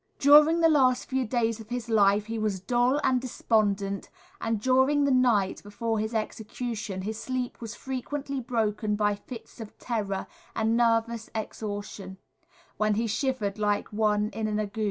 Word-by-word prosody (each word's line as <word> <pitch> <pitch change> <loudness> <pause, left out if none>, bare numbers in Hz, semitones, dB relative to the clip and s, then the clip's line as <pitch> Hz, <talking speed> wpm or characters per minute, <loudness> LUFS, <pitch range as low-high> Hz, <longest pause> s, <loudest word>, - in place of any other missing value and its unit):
During 300 +4 +6
the 330 - +6
last 265 -5 +3
few 260 -2 -1
days 230 -1 0
of 220 0 -11
his 245 -1 -4
life 205 -2 +3
he 225 0 -4
was 210 -3 -1
dull 245 +7 +2
and 255 -1 +2
despondent, 205 -5 0 0.3
and 225 -1 -1
during 265 +5 +3
the 280 - +2
night 240 -7 +2
before 220 +2 -3
his 220 +2 -3
execution 215 -2 -4
his 215 +2 -4
sleep 255 -2 -4
was 230 -1 -6
frequently 275 +1 -4
broken 215 -3 -1
by 205 0 +2
fits 230 +4 -10
of 220 - -10
terror 205 -5 -3 0.3
and 225 +1 +1
nervous 230 -1 +1
exhaustion, 205 -3 -5 0.6
when 215 -1 +2
he 230 +2 0
shivered 220 -3 -1
like 205 0 0
one 210 -1 +1
in 220 -1 -3
an 210 0 -1
ague. 210 +1 -4
225 Hz, 160 wpm, -27 LUFS, 210-250 Hz, 0.6 s, During